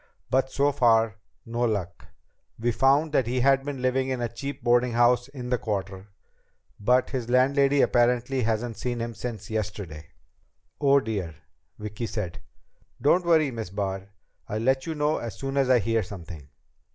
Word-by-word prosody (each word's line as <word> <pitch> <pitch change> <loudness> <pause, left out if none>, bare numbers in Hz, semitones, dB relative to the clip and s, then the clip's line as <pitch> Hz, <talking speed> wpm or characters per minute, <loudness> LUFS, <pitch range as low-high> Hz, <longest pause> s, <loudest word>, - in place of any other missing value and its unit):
But 130 +1 +2
so 140 +1 +2
far, 115 -5 +3 0.3
no 115 0 -5
luck. 100 -7 -2 0.5
We 120 +2 0
found 140 +6 +3
that 130 -6 +2
he 125 +1 0
had 135 +1 +4
been 135 -3 -5
living 130 +1 +1
in 130 -1 -2
a 120 - -1
cheap 140 +4 -6
boardinghouse 120 0 +3
in 130 -3 -7
the 125 - +2
Quarter, 95 -2 -4 0.7
but 125 +5 +2
his 125 -3 -3
landlady 135 +2 +4
apparently 125 +2 +2
hasn't 115 0 -1
seen 120 +2 -3
him 115 0 -3
since 110 -4 -6
yesterday." 100 -8 -4 0.7
"Oh, 140 -1 +4
dear!" 100 -9 -4 0.4
Vicki 105 +2 -5
said. 95 -7 -5 0.6
"Don't 170 +7 +3
worry, 160 -4 +4
Miss 115 -5 -5
Barr. 95 0 -4 0.4
I'll 105 - -2
let 130 +3 +1
you 160 - -3
know 150 +1 +1
as 115 -2 -6
soon 135 0 -4
as 135 -2 +2
I 130 - +6
hear 115 0 +1
something." 85 -8 -9
120 Hz, 165 wpm, -26 LUFS, 110-135 Hz, 0.7 s, I